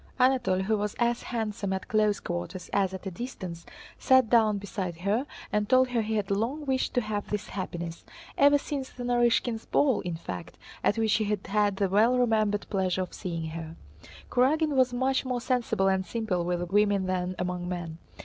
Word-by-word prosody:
Anatole, 250 -8 +3
who 215 +2 +1
was 210 0 -2
as 235 0 +1
handsome 215 -4 -3
at 190 - -4
close 215 -3 +2
quarters 90 - -5
as 195 -2 +2
at 190 +1 -8
a 190 - -3
distance, 185 -5 -7 0.3
sat 260 -4 +4
down 220 -3 +4
beside 190 -3 -4
her 215 +9 0 0.3
and 210 -1 +1
told 255 0 +5
her 240 -2 +1
he 220 0 -2
had 200 -2 -1
long 240 +10 -1
wished 265 -1 0
to 245 - +3
have 210 -2 -4
this 210 0 -3
happiness—ever 195 - 0
since 280 -2 -4
the 245 - -8
Narýshkins' 240 -1 +1
ball 270 -5 +3
in 175 -2 -4
fact, 90 - -7 0.3
at 210 - +2
which 220 -2 +2
he 215 - +2
had 205 -2 -2
had 205 -1 +1
the 195 0 +1
well 220 +6 +4
remembered 215 -4 +2
pleasure 190 -2 +1
of 180 - -9
seeing 165 -4 -4
her. 165 0 -7 0.6
Kurágin 300 +6 +3
was 260 -2 +3
much 260 +2 +1
more 255 -2 -2
sensible 240 -6 0
and 190 0 +2
simple 185 -3 -2
with 175 0 -2
women 205 -1 +3
than 185 0 -1
among 180 0 -3
men. 170 -2 -5
210 Hz, 190 wpm, -28 LUFS, 185-245 Hz, 0.6 s, told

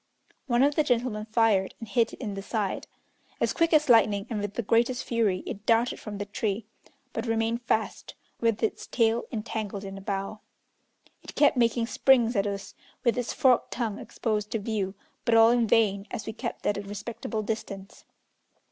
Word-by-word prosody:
One 240 0 +3
of 290 +1 +4
the 305 - +2
gentlemen 240 -5 0
fired, 215 -4 +2
and 225 - -7
hit 230 0 +2
it - - -10
in 215 -6 -4
the 195 - -5
side. 205 -1 -2 0.5
As - - +1
quick 330 -1 +2
as 305 -2 +4
lightning, 215 -4 +4
and 210 -2 -1
with 205 0 -4
the 235 - -1
greatest 235 +4 +2
fury, 215 -6 0
it 200 - -6
darted 230 +1 +3
from 210 -2 -7
the 205 - -3
tree, 205 0 -2 0.5
but - - -3
remained 225 +1 0
fast, 225 -2 -2 0.2
with 230 -1 +1
its 220 - -1
tail 230 0 +1
entangled 215 -3 -4
in 195 0 -7
a - - -12
bough. 195 +1 -4 0.8
It - - -11
kept 290 -1 +5
making 235 -1 +2
springs 240 -1 +3
at 200 0 +2
us, 200 -1 -5 0.3
with 235 - +3
its 245 -2 -2
forked 255 -3 +3
tongue 225 -5 -2
exposed 215 -2 -2
to - - +2
view, 205 -2 -2 0.3
but 230 - +3
all 225 0 +7
in 240 -1 +3
vain, 205 -2 +2
as 220 -4 -5
we 220 - -4
kept 235 +1 -6
at 205 - +1
a - - -3
respectable 215 +2 -5
distance. 200 -3 -5
225 Hz, 190 wpm, -27 LUFS, 205-235 Hz, 0.8 s, all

